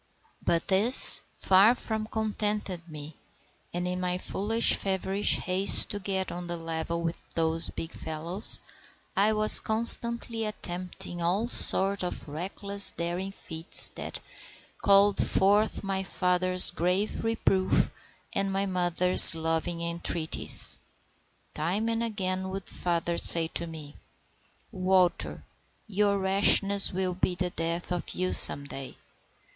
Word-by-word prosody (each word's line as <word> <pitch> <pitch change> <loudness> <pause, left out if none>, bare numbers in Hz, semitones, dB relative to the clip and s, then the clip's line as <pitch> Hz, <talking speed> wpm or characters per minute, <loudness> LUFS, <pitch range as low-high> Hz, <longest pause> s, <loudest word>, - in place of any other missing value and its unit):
But 170 -1 -1
this 210 +7 +7 0.2
far 195 +5 +2
from 220 -2 -6
contented 210 -5 -5
me, 150 0 -12 0.5
and 175 +1 -6
in 180 0 -5
my 180 0 -4
foolish 215 +5 -1
feverish 195 +1 -2
haste 185 +2 +1
to 205 - -6
get 190 -1 -5
on 175 0 -9
a 175 - -6
level 165 +1 -6
with 165 0 -6
those 165 0 -2
big 165 - -9
fellows, 165 +6 +2 0.6
I 210 +3 0
was 215 0 +6
constantly 235 +1 +2
attempting 180 -4 -8
all 190 +7 -3
sort 200 -4 0
of 180 -3 -8
reckless, 200 +6 -1
daring 175 +3 -6
feats, 165 -4 +1
that - - -10 0.6
called 200 0 +2
forth 205 +3 -1
my 195 -1 -4
father's 185 -1 +3
grave 180 +5 -4
reproof 210 -4 -2 0.4
and 195 0 -3
my 195 +1 -3
mother's 180 -2 +7
loving 165 +1 -4
entreaties. 170 -1 -3 0.7
Time 185 +8 -4
and 230 0 -4
again 190 -4 -5
would 195 0 -8
father 170 -1 -4
say 165 -1 +5
to 170 - -4
me,— 155 -3 -13 0.7
"Walter, 185 -3 -2 0.4
your 205 -1 -2
rashness 195 +1 +2
will 185 0 -4
be 180 0 -4
the 180 0 -5
death 170 +2 -6
of 175 -1 -6
you 185 0 -4
some 140 - +5
day. 135 -1 -11
185 Hz, 125 wpm, -25 LUFS, 170-200 Hz, 0.7 s, this